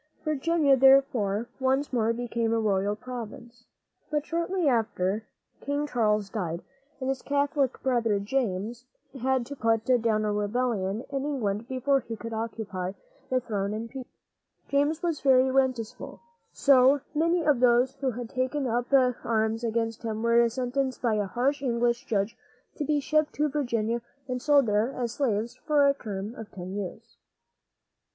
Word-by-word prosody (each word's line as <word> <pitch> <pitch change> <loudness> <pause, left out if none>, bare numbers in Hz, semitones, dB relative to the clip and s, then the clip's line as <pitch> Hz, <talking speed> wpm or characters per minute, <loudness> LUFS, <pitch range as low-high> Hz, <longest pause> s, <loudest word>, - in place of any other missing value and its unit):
Virginia, 305 -1 +3
therefore, 260 -6 +4
once 265 +2 +1
more 230 -2 +2
became 235 -1 -1
a 230 - +2
royal 205 -1 +1
province. 240 0 -9 0.4
But 300 -1 -1
shortly 340 +1 -1
after, 215 -4 0 0.4
King 285 +1 -1
Charles 215 -6 +1
died, 175 -5 -4 0.4
and 260 - -3
his 270 -1 -1
Catholic 285 -2 0
brother, 235 -5 +2
James, 225 +1 -2 0.3
had 260 -1 +1
to 285 - -7
put 225 -3 +1
down 230 -4 +2
a 210 - 0
rebellion 210 -1 -1
in 275 -1 -2
England 230 -7 -2
before 270 +2 +1
he 230 -2 -7
could 230 +1 -7
occupy 215 -5 -4 0.4
the 255 - +2
throne 210 -4 -2
in 225 +2 -4
peace. 260 -1 -8 0.6
James 290 +4 +1
was 335 -4 -1
very 260 -1 +4
resentful; 255 -4 -1 0.3
so 275 0 +5
many 335 +3 +2
of 295 -5 +3
those 245 +1 +4
who 270 -1 0
had 245 -1 -5
taken 260 +2 -1
up 240 0 0 0.4
arms 220 0 0
against 225 0 -1
him 220 -1 -3
were 235 0 +4
sentenced 255 +2 -2
by 235 -2 +2
a 205 -2 0
harsh 260 +7 0
English 240 -2 0
judge 210 +1 0 0.4
to 300 - -3
be 295 +1 +1
shipped 305 +1 +1
to 300 +1 +1
Virginia 235 -5 -1 0.3
and 250 -1 -3
sold 290 -2 +4
there 215 +3 +1
as 240 -3 -2
slaves 230 -4 -1
for 295 -2 +4
a 280 - +5
term 210 -4 -6
of 225 -3 -9
ten 185 -1 -7
years. 205 +3 -7
240 Hz, 155 wpm, -27 LUFS, 220-275 Hz, 0.6 s, so